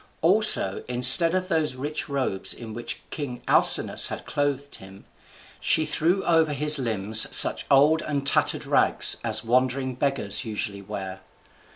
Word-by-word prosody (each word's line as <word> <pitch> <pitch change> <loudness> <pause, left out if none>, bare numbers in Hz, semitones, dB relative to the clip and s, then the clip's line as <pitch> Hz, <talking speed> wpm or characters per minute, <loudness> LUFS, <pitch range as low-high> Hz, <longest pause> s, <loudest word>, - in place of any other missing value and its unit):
Also, 185 - +3
instead 125 +8 +5
of 185 0 -3
those 160 -7 -2
rich 145 +4 -7
robes 130 -9 -3
in 115 -2 -11
which 120 +1 -8
king 130 -5 -8
Alcinous - - +3
had - - -9
clothed 145 -1 -5
him, 95 +1 -16 0.5
she 155 - -1
threw 165 +5 -2
over 160 -3 0
his 150 +1 +4
limbs 110 -3 +3
such - - +3
old 150 +4 +2
and 140 -2 -5
tattered - - -1
rags - - +1
as - - -3
wandering 130 +2 -2
beggars 135 +1 -1
usually 105 -3 -6
wear. 95 -1 -9
135 Hz, 145 wpm, -22 LUFS, 115-155 Hz, 0.5 s, instead